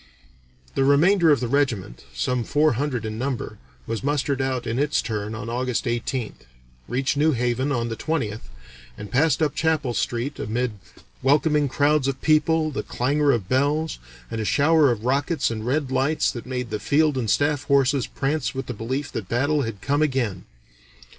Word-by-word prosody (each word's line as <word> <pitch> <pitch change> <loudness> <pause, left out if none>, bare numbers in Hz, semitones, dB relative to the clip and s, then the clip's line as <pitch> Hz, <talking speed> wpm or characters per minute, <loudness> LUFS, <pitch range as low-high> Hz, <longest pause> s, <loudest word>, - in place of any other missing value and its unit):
The 135 - +1
remainder 165 +6 +4
of 145 -5 +4
the 125 - -1
regiment, 115 - -1
some 120 - -1
four 150 +4 +2
hundred 125 -2 -2
in 110 0 -4
number, 125 -5 -3 0.3
was 115 +1 -4
mustered 140 -1 0
out 130 -2 -1
in 115 +2 -2
its 145 +1 +1
turn 105 -1 -3
on 105 0 -6
August 125 +1 -1
18th, 120 - -3 0.4
reached 135 +3 -1
New 155 +2 +3
Haven 125 +3 0
on 120 -3 -1
the 115 - -3
20th, 110 - -3 0.5
and 105 -1 -8
"passed 155 +4 +2
up 145 -2 +1
Chapel 155 -6 0
Street 120 +5 -2
amid 120 +3 -1 0.5
welcoming 145 +2 +3
crowds 145 +1 +2
of 135 -1 -2
people, 155 +1 +2
the 140 - -3
clangor 140 +3 +1
of 115 -8 -1
bells, 145 +6 0 0.3
and 115 - -2
a - - -1
shower 145 +6 +4
of 115 -2 -2
rockets 140 +3 +1
and 110 0 -4
red 135 0 0
lights 135 +4 +1
that 120 -2 -8
made 125 -2 -4
the 105 - -2
field 150 0 +2
and 120 -4 -2
staff 145 +2 +1
horses 140 -2 +2
prance 140 0 -2
with 135 0 -3
the 125 - -5
belief 130 +6 -4
that 100 -5 -5
battle 145 +5 +1
had 115 -6 -5
come 145 +1 0
again. 130 -11 -1
130 Hz, 180 wpm, -23 LUFS, 115-145 Hz, 0.5 s, remainder